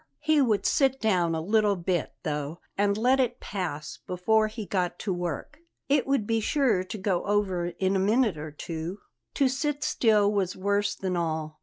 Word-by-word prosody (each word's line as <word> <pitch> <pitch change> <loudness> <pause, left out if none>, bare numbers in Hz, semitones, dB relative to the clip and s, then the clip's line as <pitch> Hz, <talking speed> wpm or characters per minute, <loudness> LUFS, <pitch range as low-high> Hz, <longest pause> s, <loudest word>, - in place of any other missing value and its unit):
He 305 -1 +3
would 220 -6 +1
sit 270 -1 +2
down 180 -6 +2
a 160 - -2
little 210 +3 +2
bit, 175 -2 -1
though, 150 0 -3 0.2
and 200 0 +1
let 255 +4 +3
it 250 -1 0
pass 165 -7 -5
before 215 +5 +2
he 215 0 -6
got 180 -3 -1
to 195 - -2
work. 175 - -4 0.3
It 280 -1 +2
would 275 -6 +1
be 225 +1 +1
sure 225 -5 +2
to 185 +3 -7
go 190 -3 0
over 195 -4 0
in 190 +2 -1
a - - +2
minute 215 +1 +2
or 155 +1 -6
two. 165 +5 -6 0.3
To 275 - +3
sit 285 +2 -1
still 210 -3 +3
was 190 -3 0
worse 200 +1 0
than 185 -2 -2
all. 160 -2 -2
200 Hz, 185 wpm, -27 LUFS, 175-225 Hz, 0.3 s, He